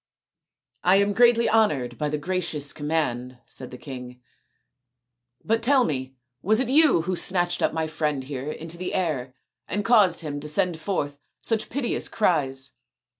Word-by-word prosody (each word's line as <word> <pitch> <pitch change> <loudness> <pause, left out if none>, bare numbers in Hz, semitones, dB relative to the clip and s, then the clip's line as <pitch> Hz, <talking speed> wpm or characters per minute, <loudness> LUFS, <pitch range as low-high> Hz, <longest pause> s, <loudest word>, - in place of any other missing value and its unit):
" - - -64 0.3
I 180 +2 +5
am 200 +1 +3
greatly 235 +1 +5
honoured 145 - +1
by 150 -1 0
the 150 - -1
gracious 155 -3 -2
com 145 - -6
mand," 125 -6 -1
said 130 - -7
the 125 - -9
king, 125 -2 -9 0.7
" 120 0 -50
but 225 +1 +1
tell 260 +2 +4
me, 130 - -3 0.3
was 215 +4 +2
it 260 -2 0
you 290 - +5
who 185 +1 -1
snatched 175 -1 +1
up - - +2
my 160 0 -1
friend 150 -3 -2
here 135 +1 -5
into 165 +2 -7
the 180 +1 -4
air 135 -8 -2 0.3
and 205 -1 -2
caused 205 -8 +4
him 145 -3 -4
to 150 - -7
send 175 +1 0
forth 145 -6 -2 0.2
such 220 -1 -1
piteous 255 -1 -1
cries." 140 -9 0
160 Hz, 175 wpm, -25 LUFS, 135-200 Hz, 0.7 s, I